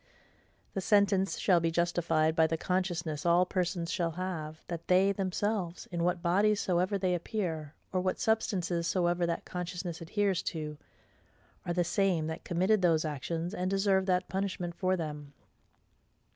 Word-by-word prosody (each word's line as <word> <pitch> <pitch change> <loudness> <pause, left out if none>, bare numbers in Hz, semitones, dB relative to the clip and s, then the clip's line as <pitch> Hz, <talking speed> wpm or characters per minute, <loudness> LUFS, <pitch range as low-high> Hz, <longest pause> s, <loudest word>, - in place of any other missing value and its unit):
The 195 - -2
sentence 195 -1 +3
shall 180 -4 +4
be 165 0 +1
justified 165 -2 +1
by 160 -1 +5
the 165 +1 -1
consciousness 170 -4 -1
all 175 +1 +4
persons 175 -2 -1
shall 170 -3 0
have, 160 -3 -5
that 170 -2 -6
THEY 190 +2 +5
THEMSELVES, 195 -1 -2
in 170 -1 -1
what 175 0 0
bodies 200 +4 +3
soever 185 +2 +1
they 185 -2 +1
appear, 170 -5 -3 0.2
or 185 - +1
what 185 0 -1
substances 180 -6 0
soever 175 -1 +1
that 170 - -2
consciousness 175 -1 -5
adheres 195 +2 0
to, 150 -3 -4 0.9
are 175 - 0
the 175 0 +2
SAME 180 -2 +1
that 160 0 -5
committed 190 +4 +2
those 165 -3 +3
actions, 165 +4 -3
and 185 -3 -1
deserve 195 -1 +2
that 180 0 +1
punishment 185 -3 -2
for 185 +1 0
them. 150 -3 -6
175 Hz, 155 wpm, -31 LUFS, 165-190 Hz, 0.9 s, by